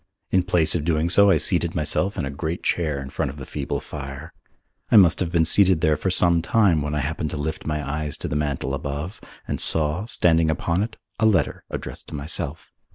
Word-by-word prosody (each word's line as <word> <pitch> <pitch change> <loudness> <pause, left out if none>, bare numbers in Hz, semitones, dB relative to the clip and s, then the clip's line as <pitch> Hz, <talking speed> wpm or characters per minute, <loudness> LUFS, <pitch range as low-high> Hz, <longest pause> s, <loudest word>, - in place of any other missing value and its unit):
In 95 - +3
place 90 -3 +3
of 85 - -1
doing 80 +1 0
so 100 +1 +6
I 95 - +4
seated 85 +1 +1
myself 85 +6 0
in - - -2
a 70 - -5
great 80 +4 -5
chair 75 -5 -1
in 70 0 -8
front 70 - -2
of 70 - -9
the 70 - -8
feeble - - -4
fire. 70 -2 -9 0.6
I - - +3
must 95 -6 +6
have 85 -3 -1
been 85 -2 +2
seated 95 -1 +4
there 80 -1 +3
for 95 - -2
some 85 -2 +4
time 90 -3 +2
when 75 +1 -3
I 75 - -1
happened 75 +2 -3
to 75 - -5
lift 75 +2 -5
my 75 -1 -3
eyes 75 0 -4
to - - -5
the - - -4
mantel 70 -3 -2
above 70 +6 -5 0.3
and - - -3
saw, 80 +6 +2
standing 85 -8 +3
upon 85 +3 -1
it, 110 +2 -4 0.2
a 110 - +4
letter 105 -4 0
addressed - - -7
to - - -8
myself. 75 +1 -2
80 Hz, 225 wpm, -23 LUFS, 75-90 Hz, 0.6 s, so